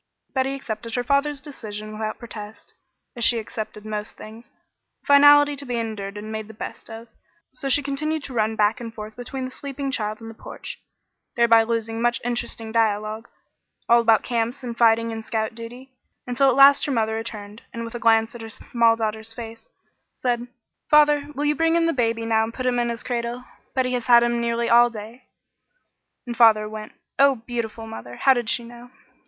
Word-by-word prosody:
Betty 270 Hz, 0 st, 0 dB
accepted 230 Hz, -3 st, -5 dB
her 245 Hz, -, 0 dB
father's 280 Hz, +2 st, +1 dB
decision 215 Hz, -7 st, -8 dB
without 215 Hz, 0 st, -4 dB
protest, 220 Hz, -3 st, -10 dB, 0.4 s
as 240 Hz, -, -3 dB
she 235 Hz, -, +5 dB
accepted 215 Hz, -1 st, -6 dB
most 210 Hz, -1 st, -5 dB
things, 220 Hz, +2 st, -12 dB, 0.5 s
a -, -, -33 dB
finality 290 Hz, 0 st, +7 dB
to 285 Hz, -, -5 dB
be 250 Hz, -3 st, -4 dB
endured 210 Hz, -3 st, -4 dB
and 215 Hz, +1 st, -7 dB
made 220 Hz, -1 st, -5 dB
the 220 Hz, -, -12 dB
best -, -, -8 dB
of, 225 Hz, +1 st, -9 dB, 0.4 s
so 270 Hz, +1 st, -5 dB
she 290 Hz, +2 st, +2 dB
continued 300 Hz, +2 st, -2 dB
to 265 Hz, -, -8 dB
run 220 Hz, -1 st, 0 dB
back 215 Hz, +2 st, +2 dB
and 230 Hz, -1 st, -6 dB
forth 215 Hz, -1 st, -9 dB
between 255 Hz, +2 st, -5 dB
the 255 Hz, -, -6 dB
sleeping 275 Hz, 0 st, -5 dB
child 215 Hz, -3 st, -3 dB
and 225 Hz, -, -10 dB
the 225 Hz, -, -8 dB
porch, -, -, -9 dB, 0.6 s
thereby 235 Hz, -2 st, +6 dB
losing 225 Hz, 0 st, -2 dB
much 240 Hz, 0 st, +2 dB
interesting 235 Hz, -2 st, -3 dB
dialogue, 215 Hz, 0 st, 0 dB, 0.6 s
all 235 Hz, 0 st, +6 dB
about 225 Hz, -1 st, +4 dB
camps 240 Hz, +2 st, -2 dB
and 240 Hz, -2 st, -5 dB
fighting 230 Hz, 0 st, +4 dB
and 225 Hz, 0 st, -5 dB
scout 220 Hz, 0 st, -2 dB
duty, 240 Hz, +3 st, -10 dB, 0.3 s
until 255 Hz, +2 st, +3 dB
at 250 Hz, -, +2 dB
last 275 Hz, +1 st, +7 dB
her -, -, -1 dB
mother 220 Hz, -3 st, +1 dB
returned 215 Hz, -1 st, -6 dB
and 230 Hz, 0 st, -5 dB
with 230 Hz, -, -8 dB
a 240 Hz, -, -5 dB
glance 225 Hz, 0 st, +3 dB
at 240 Hz, -, -9 dB
her 225 Hz, -, -7 dB
small 230 Hz, +1 st, +2 dB
daughter's 220 Hz, 0 st, -3 dB
face 225 Hz, -1 st, -9 dB, 0.5 s
said: 240 Hz, -1 st, -1 dB, 0.4 s
"Father, 295 Hz, -1 st, +5 dB
will 290 Hz, +2 st, -1 dB
you 295 Hz, -, +3 dB
bring 325 Hz, +3 st, +2 dB, 0.2 s
baby 230 Hz, -3 st, 0 dB
in 225 Hz, -, -4 dB
now 220 Hz, 0 st, +3 dB
and 225 Hz, +1 st, -5 dB
put 255 Hz, -, -4 dB
him 245 Hz, -1 st, +1 dB
in 240 Hz, 0 st, 0 dB
his 235 Hz, 0 st, -4 dB
cradle? 240 Hz, 0 st, -3 dB, 0.3 s
Betty 255 Hz, -1 st, +1 dB
has 245 Hz, -1 st, -2 dB
had 235 Hz, -1 st, +7 dB
him 240 Hz, 0 st, 0 dB
nearly 235 Hz, 0 st, 0 dB
all 240 Hz, +1 st, +6 dB
day." 230 Hz, +3 st, -10 dB, 1.0 s
And 240 Hz, -1 st, -5 dB
father 220 Hz, -2 st, +5 dB
went. 215 Hz, 0 st, -8 dB, 0.3 s
Oh, 275 Hz, 0 st, +6 dB
beautiful 230 Hz, -2 st, -4 dB
mother! 120 Hz, -, -9 dB
How 270 Hz, -, +4 dB
did 240 Hz, -3 st, -2 dB
she 240 Hz, -, -1 dB
know! 240 Hz, +1 st, -12 dB
230 Hz, 195 wpm, -23 LUFS, 220-250 Hz, 1.0 s, finality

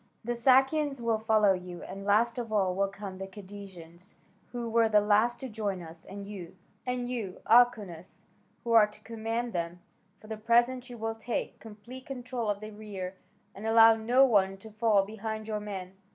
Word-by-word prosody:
The 240 Hz, +2 st, -1 dB
Sakians 270 Hz, +3 st, +3 dB
will 230 Hz, -2 st, 0 dB
follow 215 Hz, -3 st, +4 dB
you, 180 Hz, -1 st, -7 dB
and 195 Hz, +1 st, -8 dB
last 230 Hz, +4 st, +2 dB
of 230 Hz, -2 st, -5 dB
all 195 Hz, -4 st, +2 dB
will 195 Hz, +2 st, +1 dB
come 195 Hz, -1 st, -8 dB
the 195 Hz, -, -5 dB
Cadousians, 190 Hz, -2 st, -11 dB, 0.4 s
who 240 Hz, -1 st, -4 dB
were 230 Hz, 0 st, +3 dB
the 210 Hz, -1 st, +5 dB
last 215 Hz, +4 st, +2 dB
to 265 Hz, -, -4 dB
join 205 Hz, -5 st, -3 dB
us, 165 Hz, 0 st, -12 dB
and 200 Hz, +1 st, -8 dB
you, 190 Hz, -4 st, -9 dB, 0.3 s
Alkeunas, 230 Hz, -6 st, +1 dB, 0.4 s
who 235 Hz, -, -3 dB
are 225 Hz, -2 st, +7 dB
to 210 Hz, 0 st, -16 dB
command 230 Hz, +1 st, -3 dB
them, 170 Hz, 0 st, -3 dB, 0.4 s
for -, -, -17 dB
the 220 Hz, 0 st, -6 dB
present 240 Hz, +3 st, +2 dB
you 240 Hz, -, -8 dB
will 225 Hz, 0 st, -2 dB
take 225 Hz, +1 st, -4 dB
complete 230 Hz, +4 st, -11 dB
control 250 Hz, -4 st, -4 dB
of 205 Hz, 0 st, -1 dB
the 215 Hz, 0 st, -7 dB
rear, 205 Hz, -3 st, -6 dB, 0.4 s
and 210 Hz, +3 st, -6 dB
allow 225 Hz, 0 st, +8 dB
no 240 Hz, +5 st, +4 dB
one 195 Hz, -5 st, +2 dB
to 220 Hz, +3 st, -13 dB
fall 215 Hz, -2 st, +3 dB
behind 220 Hz, +1 st, -5 dB
your 215 Hz, -1 st, -2 dB
men. 190 Hz, -3 st, -6 dB
215 Hz, 180 wpm, -29 LUFS, 195-235 Hz, 0.4 s, allow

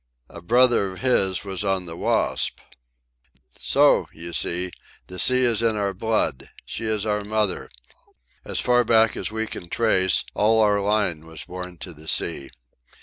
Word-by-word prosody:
A 85 Hz, -, -11 dB
brother 120 Hz, +1 st, +3 dB
of 95 Hz, -, -10 dB
his 95 Hz, -8 st, +2 dB
was 95 Hz, +1 st, -3 dB
on 95 Hz, -2 st, -1 dB
the 85 Hz, -1 st, -7 dB
Wasp. -, -, 0 dB, 1.0 s
"So, -, -, +3 dB
you 85 Hz, +1 st, -9 dB
see, 85 Hz, +5 st, -1 dB, 0.3 s
the 90 Hz, 0 st, -9 dB
sea 130 Hz, 0 st, +3 dB
is 115 Hz, -2 st, +1 dB
in 115 Hz, -1 st, +1 dB
our 100 Hz, -2 st, -1 dB
blood. 110 Hz, -, -1 dB, 0.2 s
She 115 Hz, -, -5 dB
is 110 Hz, -1 st, -1 dB
our 105 Hz, -1 st, -1 dB
mother. 105 Hz, -2 st, -1 dB, 0.7 s
As -, -, -2 dB
far 125 Hz, 0 st, +3 dB
back 115 Hz, -1 st, +3 dB
as -, -, -3 dB
we 110 Hz, +1 st, -3 dB
can 85 Hz, -5 st, -8 dB
trace 95 Hz, -6 st, +2 dB
all 110 Hz, +2 st, +3 dB
our 105 Hz, -2 st, +3 dB
line 100 Hz, -6 st, 0 dB
was 80 Hz, -2 st, -7 dB
born 90 Hz, 0 st, -8 dB
to 90 Hz, -, -6 dB
the 80 Hz, +1 st, -14 dB
sea." 70 Hz, -, -1 dB
100 Hz, 165 wpm, -23 LUFS, 90-110 Hz, 1.0 s, brother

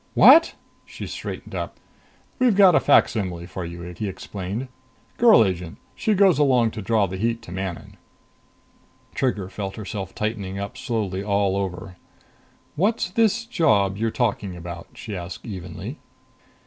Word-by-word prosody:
"What!" 330 Hz, +1 st, +7 dB, 0.3 s
She -, -, -8 dB
straightened -, -, -7 dB
up. -, -, -5 dB, 0.6 s
"We've 250 Hz, -5 st, +4 dB
got 195 Hz, -2 st, +7 dB
a -, -, +5 dB
facsimile 95 Hz, -11 st, +2 dB
for 95 Hz, 0 st, -6 dB
you," 85 Hz, 0 st, -7 dB
he 105 Hz, +4 st, -3 dB
explained. 100 Hz, +5 st, -5 dB, 0.5 s
"Girl 225 Hz, -, +7 dB
agent. 90 Hz, -3 st, -4 dB, 0.2 s
She 215 Hz, -, 0 dB
goes 190 Hz, -5 st, +4 dB
along 125 Hz, -6 st, +3 dB
to 110 Hz, -, -6 dB
draw 105 Hz, +1 st, +2 dB
the 95 Hz, 0 st, -5 dB
heat 115 Hz, +3 st, -1 dB
to -, -, -11 dB
Manon." 95 Hz, -1 st, -6 dB, 1.2 s
Trigger 110 Hz, -8 st, -1 dB
felt 95 Hz, 0 st, -5 dB
herself 100 Hz, -2 st, -6 dB
tightening 105 Hz, -3 st, -3 dB
up 100 Hz, +1 st, -5 dB
slowly 100 Hz, -5 st, -3 dB
all 100 Hz, -1 st, +1 dB
over. 95 Hz, -2 st, -4 dB, 0.8 s
"What's 200 Hz, +2 st, 0 dB
this 225 Hz, +1 st, +2 dB
job 110 Hz, -, +2 dB
you're 115 Hz, +3 st, 0 dB
talking 105 Hz, -5 st, -1 dB
about?" 85 Hz, 0 st, -8 dB
she 105 Hz, -, -7 dB
asked 90 Hz, 0 st, -7 dB
evenly. 90 Hz, -6 st, -7 dB
100 Hz, 145 wpm, -23 LUFS, 95-125 Hz, 1.2 s, What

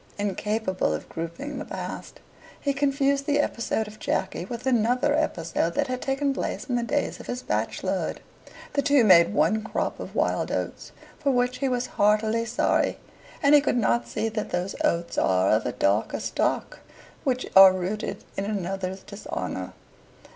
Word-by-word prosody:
Incapable 205 Hz, -, -1 dB
of -, -, -7 dB
grouping 170 Hz, -, -5 dB
the -, -, -4 dB
past, -, -, -7 dB, 0.4 s
he 280 Hz, -, 0 dB
confused 280 Hz, 0 st, +1 dB
the 290 Hz, -1 st, +2 dB
episode 230 Hz, -5 st, -1 dB
of 215 Hz, 0 st, -12 dB
Jacky 175 Hz, -, -2 dB
with 235 Hz, +4 st, -7 dB
another 250 Hz, +3 st, +2 dB
episode 170 Hz, -, -1 dB
that -, -, +2 dB
had 255 Hz, 0 st, -4 dB
taken 275 Hz, +1 st, 0 dB
place -, -, -3 dB
in 255 Hz, -, -4 dB
the 240 Hz, -, +1 dB
days 290 Hz, +5 st, -1 dB
of -, -, -10 dB
his 245 Hz, 0 st, -4 dB
bachelorhood. -, -, -2 dB, 0.5 s
The 285 Hz, -, +2 dB
two 280 Hz, -2 st, +4 dB
made 180 Hz, -4 st, +7 dB
one 215 Hz, +1 st, +2 dB
crop 220 Hz, -, -3 dB
of -, -, -8 dB
wild -, -, 0 dB
oats, -, -, -4 dB, 0.3 s
for 280 Hz, -, 0 dB
which 250 Hz, 0 st, +1 dB
he 275 Hz, -, +1 dB
was 250 Hz, -1 st, 0 dB, 0.2 s
heartily 215 Hz, +2 st, +3 dB
sorry, 230 Hz, +2 st, +1 dB, 0.5 s
and 280 Hz, +1 st, +5 dB
he 295 Hz, -, +8 dB
could 275 Hz, -, +1 dB
not 120 Hz, -, +1 dB
see 130 Hz, -, -2 dB
that 215 Hz, -1 st, -3 dB
those 180 Hz, +2 st, -2 dB
oats 170 Hz, 0 st, 0 dB
are 95 Hz, 0 st, +3 dB
of 110 Hz, -, +2 dB
a -, -, -1 dB
darker 100 Hz, +3 st, +1 dB
stock -, -, -1 dB, 0.4 s
which 255 Hz, -3 st, 0 dB
are 195 Hz, 0 st, +11 dB
rooted 185 Hz, +3 st, -3 dB
in 195 Hz, -, -2 dB
another's 190 Hz, -2 st, -3 dB
dishonour. 200 Hz, 0 st, -5 dB
220 Hz, 170 wpm, -26 LUFS, 185-270 Hz, 0.5 s, are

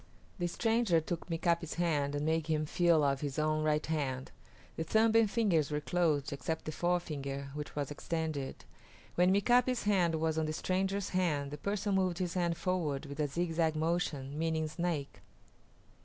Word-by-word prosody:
The 175 Hz, -, 0 dB
stranger 225 Hz, -2 st, +2 dB
took 165 Hz, +1 st, -5 dB
Mika´pi's 170 Hz, -1 st, 0 dB
hand 150 Hz, -5 st, 0 dB
and 145 Hz, +1 st, -1 dB
made 160 Hz, 0 st, +1 dB
him 155 Hz, -1 st, +1 dB
feel 170 Hz, 0 st, +3 dB
of 140 Hz, -1 st, +1 dB
his 145 Hz, -3 st, -3 dB
own 155 Hz, 0 st, +1 dB
right 150 Hz, 0 st, +1 dB
hand. 135 Hz, -4 st, -2 dB, 0.4 s
The 160 Hz, -, -2 dB
thumb 220 Hz, +6 st, +3 dB
and 225 Hz, -2 st, +5 dB
fingers 195 Hz, -, +2 dB
were 150 Hz, -1 st, -1 dB
closed 150 Hz, -4 st, 0 dB
except 160 Hz, +4 st, -3 dB
the 155 Hz, -, -3 dB
forefinger, 145 Hz, -6 st, -2 dB
which 150 Hz, 0 st, -6 dB
was 145 Hz, -1 st, -2 dB
extended. 155 Hz, -2 st, -3 dB, 0.5 s
When 180 Hz, +1 st, +4 dB
Mika´pi's 245 Hz, +5 st, +3 dB
hand 185 Hz, -5 st, +2 dB
was 160 Hz, 0 st, 0 dB
on 155 Hz, -, 0 dB
the 155 Hz, -, -2 dB
stranger's 190 Hz, +3 st, -1 dB
hand 150 Hz, -7 st, 0 dB
the 150 Hz, -, -5 dB
person 205 Hz, +2 st, -1 dB
moved 185 Hz, -2 st, +1 dB
his 180 Hz, -2 st, -2 dB
hand 170 Hz, -2 st, 0 dB
forward 170 Hz, -7 st, -1 dB
with 140 Hz, +1 st, -8 dB
a 150 Hz, -, +2 dB
zigzag 165 Hz, +1 st, 0 dB
motion, 155 Hz, -3 st, -1 dB
meaning 160 Hz, -1 st, 0 dB
Snake. 155 Hz, -3 st, -3 dB
160 Hz, 170 wpm, -32 LUFS, 150-180 Hz, 0.5 s, and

